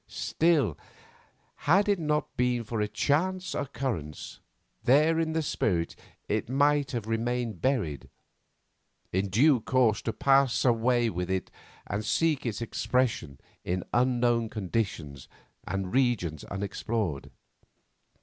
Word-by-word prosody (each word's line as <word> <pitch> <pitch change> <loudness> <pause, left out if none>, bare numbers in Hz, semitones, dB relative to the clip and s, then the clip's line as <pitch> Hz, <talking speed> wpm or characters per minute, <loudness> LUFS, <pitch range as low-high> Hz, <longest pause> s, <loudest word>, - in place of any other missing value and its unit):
Still, 155 - +1 0.9
had 195 +5 +5
it 200 -3 +2
not 150 -1 -1
been 125 -1 +1
for 110 0 -3
a 105 - +1
chance 180 - 0
occurrence, 110 - -4 0.4
there, 155 +6 +4
in 160 -1 0
the 160 0 0
spirit, 85 - -1 0.3
it - - -1
might 145 +1 +2
have 120 -6 -3
remained 115 -3 -2
buried, 100 - -1 1.0
in 95 +2 0
due 130 +7 +4
course 115 -4 +2
to 115 - -2
pass 135 +3 +3
away 120 -1 +3
with 90 +1 -3
it 95 -2 -2 0.3
and 100 +2 -3
seek 150 +2 +1
its 115 +1 -3
expression 115 - -1 0.2
in 90 +1 -2
unknown 120 -2 +2
conditions 90 - -3 0.4
and 95 -1 -3
regions 120 - +1
unexplored. 100 -4 -3
120 Hz, 120 wpm, -28 LUFS, 100-140 Hz, 1.0 s, had